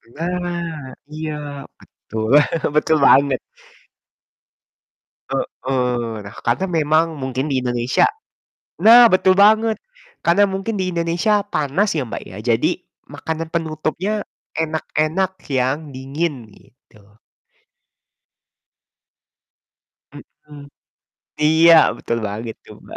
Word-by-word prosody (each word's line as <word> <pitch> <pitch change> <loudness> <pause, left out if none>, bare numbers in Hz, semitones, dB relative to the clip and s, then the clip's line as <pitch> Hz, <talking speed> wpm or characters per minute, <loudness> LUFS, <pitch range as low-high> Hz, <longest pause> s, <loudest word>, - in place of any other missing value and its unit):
Nah, 170 -4 -4 0.2
iya, 155 0 -5 0.5
betul, 110 0 -7 0.5
betul 155 +1 +3
banget. 140 -2 +4 1.9
Heeh, 125 -3 -2
nah, 100 - -10
karena 120 +11 +1
memang 155 +1 +3
mungkin 130 +1 -3
di 135 - 0
Indonesia 120 0 +1 0.7
nah, 235 +1 +8
betul 185 0 +4
banget! 220 +3 +4 0.5
Karena 190 +4 +4
mungkin 195 +2 -3
di 185 -1 -1
Indonesia 170 +5 +1
panas 190 +1 -1
ya, 135 - -2
Mbak, - - -6
ya, 95 - -9 0.2
jadi 115 - 0 0.3
makanan 160 0 -5
penutupnya 165 +6 -2 0.3
enak-enak 160 +3 -1 0.2
yang 135 +3 -1
dingin, 135 0 -4
gitu. 105 -4 -24 3.0
Mhm, 150 -1 -15 0.9
iya, 165 +2 +6 0.2
betul 115 - -3
banget 110 +3 -6
tuh, - - -13
Mbak. - - -10
155 Hz, 95 wpm, -20 LUFS, 130-180 Hz, 3.0 s, nah